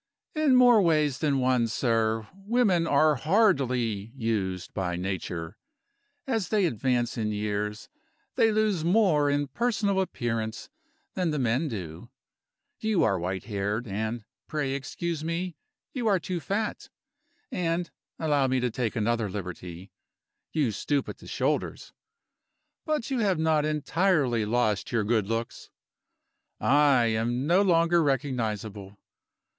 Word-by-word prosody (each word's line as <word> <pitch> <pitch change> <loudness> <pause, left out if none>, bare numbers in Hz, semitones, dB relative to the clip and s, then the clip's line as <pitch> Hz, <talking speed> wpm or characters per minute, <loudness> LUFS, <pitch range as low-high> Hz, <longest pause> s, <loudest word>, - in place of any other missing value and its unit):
"In 310 -5 +3
more 245 -3 +7
ways 155 -6 +2
than 145 -3 +1
one, 125 -2 +2
sir, 115 -2 0
women 195 -3 +1
are 150 0 +4
hardly 130 - +1
used 105 -7 -2
by 90 -3 -2
Nature. 90 -1 -4 0.7
As 225 -8 -1
they 210 -3 +2
advance 120 -3 0
in 105 -1 -1
years 105 0 -3 0.5
they 225 - +3
lose 210 -6 +1
more 170 -6 +3
in 145 0 +1
personal 210 - 0
appearance 115 -10 -3 0.4
than 180 -2 0
the 150 - -1
men 130 +4 +1
do. 90 - -7 0.7
You 215 -4 +1
are 95 -4 +2
white 95 +1 -3
haired, 105 +2 -2
and 110 +2 -3 0.2
(pray 145 -3 -2
excuse 155 +4 -4
me) 170 +1 -3 0.4
you 245 -4 -2
are 200 -3 +4
too 175 +1 -3
fat; 205 +6 -3 0.6
and 170 0 -1 0.3
(allow 145 -4 +1
me 130 0 +1
to 125 -1 -1
take 120 -1 -2
another 115 -1 0
liberty) 90 -1 -7 0.6
you 145 -7 +1
stoop 140 +7 -1
at - - -8
the - - -13
shoulders - - -2 0.9
but 300 -5 -1
you 260 - 0
have 195 -5 +2
not 155 -1 +2
entirely 150 - +1
lost 110 -3 0
your 115 -3 +1
good 110 -1 +1
looks. 115 +1 -4 0.9
I 140 -3 +4
am 115 +3 0
no 175 +5 +4
longer 170 -2 +3
recognizable. 110 -8 -2
135 Hz, 130 wpm, -27 LUFS, 110-170 Hz, 0.9 s, more